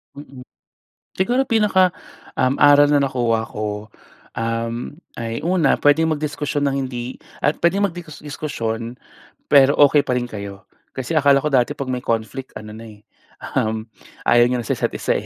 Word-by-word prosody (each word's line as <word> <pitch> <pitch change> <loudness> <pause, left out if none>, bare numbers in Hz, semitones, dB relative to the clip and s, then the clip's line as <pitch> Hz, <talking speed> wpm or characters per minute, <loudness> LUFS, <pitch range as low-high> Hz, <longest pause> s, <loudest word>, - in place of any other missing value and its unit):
Mm. 135 -3 -11 0.7
Siguro, 245 +8 +1
pinaka 195 -6 +3 0.4
um, 130 +2 +1
aral 145 0 +6
na 145 - +4
nakuha 115 -4 0
ko, 105 0 -5 0.5
um, 115 +4 -3 0.2
ay 115 0 -4
una 175 -5 +2
puwedeng 160 +3 +3
mag-diskusyon 145 -1 -2
ng 140 -1 0
hindi 125 -1 -6 0.2
At 150 - 0
puwedeng 195 +4 +3
magdi-diskusyon, 145 - -5 0.5
pero 140 -1 +6
okay 145 0 +6
pa 130 - -2
rin 125 -1 -2
kayo. 100 -3 -8 0.3
Kasi, 135 +5 -3
akala 140 -2 +5
ko 150 - 0
dati 130 0 +2
'pag 140 -2 -5
may 125 0 -3
conflict 115 +4 -3
ano 105 0 -10
na, 115 - -10
eh, 105 -2 -14 0.6
um, 110 +1 -1 0.4
ayaw 120 0 +6
niyo 125 0 0
na 115 - -8
sa - - 0
isa't - - -1
isa - - -1
135 Hz, 155 wpm, -20 LUFS, 115-150 Hz, 0.7 s, aral